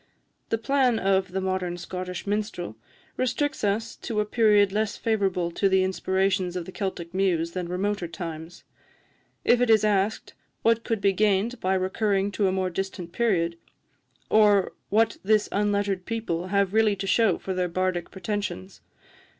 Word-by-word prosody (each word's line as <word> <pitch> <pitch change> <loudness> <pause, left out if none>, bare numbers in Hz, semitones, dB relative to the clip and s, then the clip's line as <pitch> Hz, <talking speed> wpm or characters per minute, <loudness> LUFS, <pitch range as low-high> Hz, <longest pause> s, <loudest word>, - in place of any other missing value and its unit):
The 225 - +1
plan 255 0 +2
of 190 -2 +1
'The 190 +1 -2
Modern 185 -2 -2
Scottish 180 +1 -6
Minstrel' 205 - -3 0.4
restricts 270 +3 -1
us 210 +3 0
to 220 -3 -3
a 210 - +1
period 210 -3 +4
less 215 +1 -1
favourable 195 -6 0
to 195 +3 +1
the 190 0 +3
inspirations 190 -1 0
of 180 -2 -3
the 185 - -8
Celtic 185 -4 -4
muse 175 -3 +1
than 180 -1 -4
remoter 190 0 -1
times. 165 -1 -7 0.8
If 245 0 +4
it 245 - +2
is 220 -1 +5
asked, 205 +1 0 0.3
What 230 0 +3
could 225 -4 -2
be 195 -1 +3
gained 215 +4 +1
by 190 +1 +1
recurring 195 +1 0
to 200 0 +1
a - - +1
more 185 -1 -1
distant 185 -1 -4
period? 170 -8 0 0.7
or 205 -3 +4 0.2
what 225 +1 +2
this 210 +1 +3
unlettered 200 -2 0
people 185 -7 -2
have 200 0 +1
really 220 -2 +3
to 195 0 -5
shew 200 -2 +3
for 190 - -4
their 180 -1 -1
bardic 185 0 -1
pretensions? 190 - -5
195 Hz, 160 wpm, -26 LUFS, 185-215 Hz, 0.8 s, is